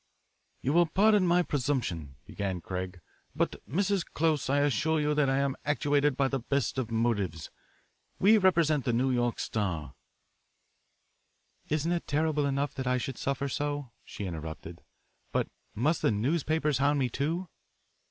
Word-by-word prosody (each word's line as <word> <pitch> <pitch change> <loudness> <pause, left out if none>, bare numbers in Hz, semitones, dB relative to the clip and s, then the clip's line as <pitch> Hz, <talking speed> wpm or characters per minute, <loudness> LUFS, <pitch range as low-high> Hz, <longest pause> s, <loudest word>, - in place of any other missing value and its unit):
"You 135 - +1
will 170 0 +5
pardon 205 +1 +4
my 175 +1 +4
presumption," 120 - -2
began 95 -3 -3
Craig, 90 0 -5 0.3
"but, - - 0
Mrs. 195 +4 +1
Close, 155 -5 0
I 140 +1 +3
assure 145 +3 +2
you 150 0 +1
that 150 -2 +2
I 135 - +2
am 140 -1 +1
actuated 145 -1 +1
by 135 - +3
the 135 0 -1
best 135 +1 -1
of 120 -3 -2
motives. 105 -9 -1 0.7
We 215 +3 +5
represent 165 -7 +3
the 120 - 0
New 130 +3 +2
York 120 -1 0
Star 85 -10 -2 0.8
" - - -42
"Isn't 155 +3 0
it 175 -1 -1
terrible 150 0 +1
enough 140 +1 -1
that 130 -1 -4
I 125 0 +2
should 130 0 -4
suffer 140 0 -1
so," 145 -2 -3
she 100 - -7
interrupted, 80 -3 -7 0.5
"but - - 0 0.3
must 150 +9 +1
the - - +3
newspapers 150 +5 +1
hound 145 +1 +3
me, 135 -2 +2
too?" 160 +9 -2
140 Hz, 155 wpm, -29 LUFS, 120-155 Hz, 0.8 s, will